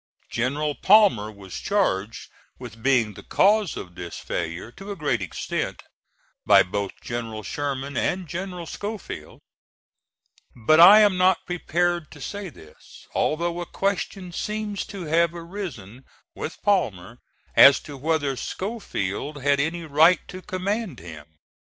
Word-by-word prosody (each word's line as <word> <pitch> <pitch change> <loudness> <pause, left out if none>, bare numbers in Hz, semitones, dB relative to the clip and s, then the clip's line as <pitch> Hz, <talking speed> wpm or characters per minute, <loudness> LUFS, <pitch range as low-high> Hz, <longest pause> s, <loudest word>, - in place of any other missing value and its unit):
General 145 +5 -1
Palmer 185 - +4
was 100 -3 -12
charged 115 - -1 0.3
with 115 -3 -10
being 120 -4 +2
the - - -11
cause 205 -2 +2
of 90 - -8
this 90 -1 -7
failure, 85 +8 -4
to 195 +9 -11
a 200 - -4
great 145 - -1
extent, 90 - -4 0.6
by - - +6
both 100 +2 -3
General 115 -3 -5
Sherman 140 0 -4
and 180 +7 -1
General 180 +1 -5
Schofield; 205 +4 -7 1.1
but 125 +7 +3
I 200 +5 +10
am 205 -3 +4
not 185 0 +3
prepared 175 -2 -1
to 145 - -13
say 200 +5 -6
this, 80 - -16
although 170 +2 0
a 175 - -6
question 195 -1 -2
seems 210 +2 -3
to 195 -3 -7
have 170 +2 +2
arisen 165 - -8 0.3
with 160 - -7
Palmer 120 - 0 0.4
as 140 0 +9
to 145 - -10
whether 145 -1 0
Schofield 145 - -4
had 140 0 +3
any 165 +4 -1
right 160 +4 +4
to 185 - -8
command 195 - -3
him. 80 -2 -11
155 Hz, 135 wpm, -24 LUFS, 120-185 Hz, 1.1 s, I